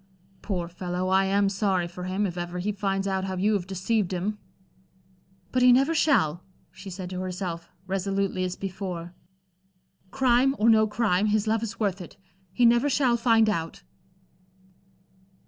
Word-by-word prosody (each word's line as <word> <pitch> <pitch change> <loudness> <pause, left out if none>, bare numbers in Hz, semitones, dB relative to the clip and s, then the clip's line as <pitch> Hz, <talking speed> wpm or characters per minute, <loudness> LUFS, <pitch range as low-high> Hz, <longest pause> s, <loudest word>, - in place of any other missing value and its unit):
"Poor 180 -5 -3
fellow, 180 +1 -4
I 190 +1 +3
am 200 +1 +2
sorry 195 -3 0
for 180 +1 -8
him, 190 +3 -1
if 180 -3 -4
ever 175 0 -5
he 190 +4 -1
finds 195 -1 -2
out 190 -1 -1
how 190 -1 -3
you 205 +4 +2
have 190 -3 -1
deceived 195 +1 -1
him." 195 +4 -3 1.1
"But 255 - +1
he 250 0 +7
never 270 +6 +4
shall," 180 - +2 0.3
she 190 +1 -10
said 185 0 -6
to 180 - -4
herself, 180 -2 -5 0.2
resolutely 195 0 -1
as 180 0 -3
before. 185 -3 -6 1.0
"Crime 260 +3 +2
or 225 +2 +4
no 220 -1 +4
crime, 210 -3 +1
his 210 0 +1
love 220 0 +1
is 225 -2 -5
worth 200 -3 -1
it. 175 - -11 0.3
He 245 +5 +2
never 240 +4 +4
shall 260 -3 +2
find 225 -2 +3
out." 165 -6 -3
195 Hz, 165 wpm, -26 LUFS, 180-220 Hz, 1.1 s, he